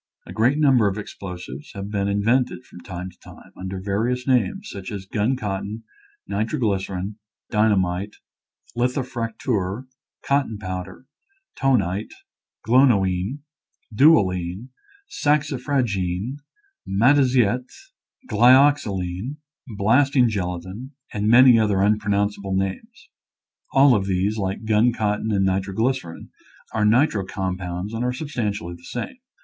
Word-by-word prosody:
A - - -9
great 125 +6 +2
number 135 -8 +4
of 100 +1 -2
explosives 90 -9 -8
have 100 +1 -6
been 100 -1 -1
in 100 0 0
vented 125 +2 +1
from - - -13
time 90 0 -7
to 90 - -27
time, - - -15
under 95 0 -6
various 115 +7 -1
names, 195 - +1
such 95 -2 -7
as 100 -2 -6
gun 105 +6 0
cotton, 105 -1 -4 0.4
nitroglycerin, 100 -3 -2 0.3
dyna 105 -1 +3
mite, 95 +3 -2 0.6
litho 125 +3 0
fracteur, 115 -3 -3 0.4
cotton 140 -6 0
powder, 95 +3 -6 0.5
tonite, 105 -7 0 0.5
glonoine, 115 -1 +3 0.5
dualine, 100 - +3 0.4
saxifragine, 130 - -1 0.5
mataziette, 125 +1 +3 0.6
glyoxiline, 120 -3 +3 0.3
blasting 125 +5 +3
gelatin, 95 - -4 0.2
and 105 0 -1
many 120 0 +7
other 105 -3 +2
unpronounceable 100 -1 0
names. 95 0 -4 0.6
All 135 -1 +6
of 100 -4 +1
these, 95 +3 0
like 95 +2 -3
gun 110 +2 +3
cotton 105 0 -1
and 95 -2 +2
nitroglycerin, 95 +1 -2 0.4
are 105 -1 +1
nitro 115 -2 +3
com 95 -1 -3
pounds 90 +3 -5
and 115 +2 -2
are 125 - 0
substantially 105 - -3
the 85 0 -14
same. 120 - -6
105 Hz, 115 wpm, -23 LUFS, 95-125 Hz, 0.6 s, many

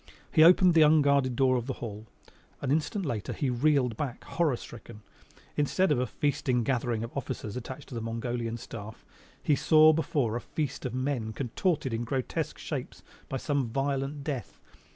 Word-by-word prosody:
He 155 - +6
opened 180 +1 +7
the 165 - +6
unguarded 140 -4 +4
door 130 0 +3
of 120 0 -4
the 135 - -1
hall. 110 -1 -7 0.5
An 135 - -2
instant 160 +6 0
later 115 -9 -3
he 135 -4 -1
reeled 125 -2 +2
back 135 -5 -4
horror 155 -7 0
stricken. 115 -3 -11 0.5
Instead 155 +5 +2
of 140 - +3
a 125 - 0
feasting 130 -1 0
gathering 120 -3 0
of 115 - -7
officers 130 -6 -4
attached 130 +3 -7
to - - -9
the 115 - -3
Mongolian 115 0 -3
Staff 110 -1 -9 0.4
he 150 - +3
saw 155 +1 +6
before 145 -7 0
a 120 - -2
feast 145 -3 -3
of 125 - -6
men 130 -4 -2
contorted 135 - -1
in 115 +1 -1
grotesque 130 +2 -2
shapes - - -6 0.3
by 135 - -2
some 140 -2 -1
violent 135 +3 -2
death. 135 -7 -5
130 Hz, 170 wpm, -29 LUFS, 120-145 Hz, 0.5 s, opened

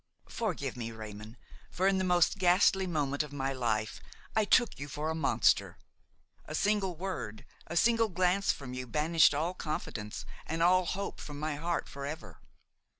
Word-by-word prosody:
"Forgive 165 - -2
me, 115 -2 -4
Raymon, 110 +1 -9 0.3
for 185 +2 +1
in 195 -1 +3
the - - +1
most 180 +1 +3
ghastly 185 +1 +4
moment 145 -4 0
of 150 -2 -5
my 135 -1 -2
life 110 -4 -1 0.3
I 220 -1 +3
took 240 - +3
you 145 - -5
for 150 +3 -3
a - - -1
monster. 160 -3 +2 0.7
A 155 - -5
single 200 -1 +1
word, 145 - -5 0.2
a 170 - -3
single 230 +2 +4
glance 185 +2 +2
from 130 -3 -7
you 130 0 -5
banished 155 +2 +4
all 165 +5 0
confidence 115 - -5 0.2
and 165 +1 0
all 185 +1 +5
hope 200 +3 -3
from 145 -1 -7
my 155 0 -2
heart 170 +3 -2
forever. 140 +3 -7
160 Hz, 165 wpm, -31 LUFS, 135-185 Hz, 0.7 s, all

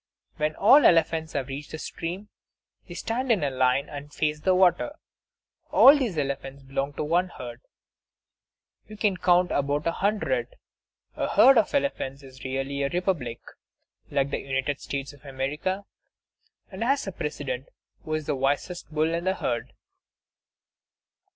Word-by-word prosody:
When 155 0 0
all 270 +9 +7
the - - +7
elephants 160 -1 +2
have 135 -3 -2
reached 140 +2 -6
the 155 - -6
stream, 180 +6 -6 0.6
they - - -9
stand 250 +3 -2
in 210 -6 +3 0.2
line 130 +2 +3
and 145 0 -8
face 150 0 -1
the 185 +4 +2
water. 185 - +3 0.7
All 275 +3 +8
these 240 - -1
elephants 140 -1 -3
belong 135 +1 -3
to - - -3
one 175 +4 +2
herd; 120 -6 -9 1.3
you 215 0 -10
can 205 -2 +1
count 180 0 +3
about 145 +1 0
a 170 - +2
hundred. 215 - -1 0.6
A - - -1
herd 270 -3 +7
of 220 - 0
elephants 140 - -1
is 130 -1 -13
really 135 +1 -3
a 140 - +1
republic, 175 -10 -2 0.7
like 140 0 0
the - - -1
United 135 +1 -2
States 140 0 -4
of 145 - -19
America, 150 +8 -3 0.9
and 190 +3 -4
has 275 +4 +1
a 195 - -4
President, 140 -6 -4 0.3
who 155 - -2
is 155 -1 -3
the 145 - -1
wisest 145 +7 -2
bull 155 +1 +1
in 170 +1 -2
the 190 0 +1
herd. 120 -9 -3
155 Hz, 155 wpm, -26 LUFS, 140-185 Hz, 1.3 s, All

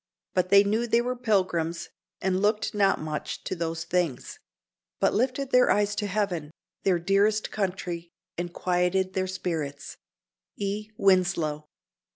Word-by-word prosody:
But 185 0 +1
they 200 +1 +7
knew 220 +4 0
they 230 +1 +3
were 250 +1 -2
pilgrims, 185 -8 0 0.3
and 190 0 +1
looked 210 +1 +1
not 200 -2 +3
much 155 -1 -4
to - - -3
those 165 -1 -3
things; 170 -6 -2 0.6
but - - +3
lifted 255 +4 0
their 250 0 +5
eyes 205 0 +2
to 205 - -1
heaven, 185 -7 -1 0.3
their 190 -2 +2
dearest 200 +4 +2
country, 180 -4 -3 0.3
and 175 0 -4
quieted 180 +1 0
their 185 0 0
spirits." 160 -6 -4 0.6
_E. 205 +1 -3
Winslow. 175 -6 +2
185 Hz, 140 wpm, -27 LUFS, 170-205 Hz, 0.6 s, they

